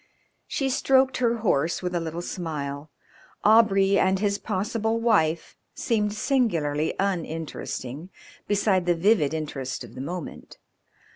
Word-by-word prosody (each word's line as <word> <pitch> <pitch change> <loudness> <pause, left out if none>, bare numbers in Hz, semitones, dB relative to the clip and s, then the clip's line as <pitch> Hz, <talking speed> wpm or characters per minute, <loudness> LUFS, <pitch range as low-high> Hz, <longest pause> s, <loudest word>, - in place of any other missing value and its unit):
She 270 - -1
stroked 265 -1 +3
her 235 -2 +1
horse 165 0 +1
with 180 0 -2
a 175 - +1
little 165 +1 -5
smile. 150 -5 -5 0.5
Aubrey 200 -3 +5
and 190 0 +3
his 200 0 0
possible 220 +3 -1
wife 170 -9 +1 0.2
seemed 210 -3 0
singularly 170 - 0
uninteresting 165 -5 -4 0.4
beside 195 -3 +1
the 175 - +3
vivid 170 -4 +3
interest 140 -5 -4
of 120 -2 -12
the 130 - -7
moment. 170 +4 -7
185 Hz, 125 wpm, -25 LUFS, 155-215 Hz, 0.5 s, Aubrey